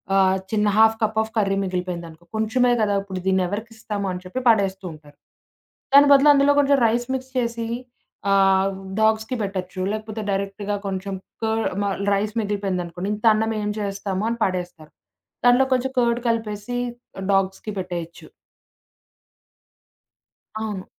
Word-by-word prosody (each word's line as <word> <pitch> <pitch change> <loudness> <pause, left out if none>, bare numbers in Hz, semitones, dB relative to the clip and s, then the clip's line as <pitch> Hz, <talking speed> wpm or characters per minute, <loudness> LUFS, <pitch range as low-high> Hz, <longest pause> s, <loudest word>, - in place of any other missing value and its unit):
ఆహ్, 190 -1 +4
చిన్న 210 -1 +2
half 220 0 +6
cup 220 0 0
of 220 - -3
curry 195 -2 +2
మిగిలిపోయిందనుకో 175 -3 -4
కొంచెమే 245 +3 +2
కదా! 205 -1 +2
ఇప్పుడు 190 -2 -6
దీన్నినేవరికిస్తాము 205 +3 -2
అని 180 0 -5
చెప్పి 185 +8 -4
పడేస్తుంటారు. 190 -8 -1 0.8
దాని 285 +1 +8
బదులు 280 +1 +7
అందులో 280 0 +4
కొంచెం 280 0 +4
రైస్ 240 +2 0
మిక్స్ 260 0 -4
చేసి, 235 -2 -1 0.6
ఆహ్, 195 0 +4 0.3
డాగ్స్‌కి 220 +3 +1
పెట్టొచ్చు, 185 -2 -4
లేకపోతే 215 0 -5
డైరెక్ట్‌గా 200 +1 -2
కొంచెం 195 0 -3 0.3
క - - +2 0.4
మ - - -1 0.3
రైస్ 210 +2 -1
మిగిలిపోయిందనుకోండి, 195 -3 -3
ఇంత 210 - -7
అన్నం 220 +1 0
ఏం 210 - -1
చేస్తాముని 200 +2 -2
పడేస్తారు. 175 -4 -5 0.5
దాంట్లో 245 +2 +6
కొంచెం 255 +1 0
కర్డ్ 235 0 +1
కలిపేసి 225 +1 -2 0.6
డాగ్స్‌కి 195 +2 0
పెట్టేయొచ్చు. 175 -2 -6 2.3
అవును. 210 -4 -4
205 Hz, 125 wpm, -23 LUFS, 190-225 Hz, 2.3 s, దాని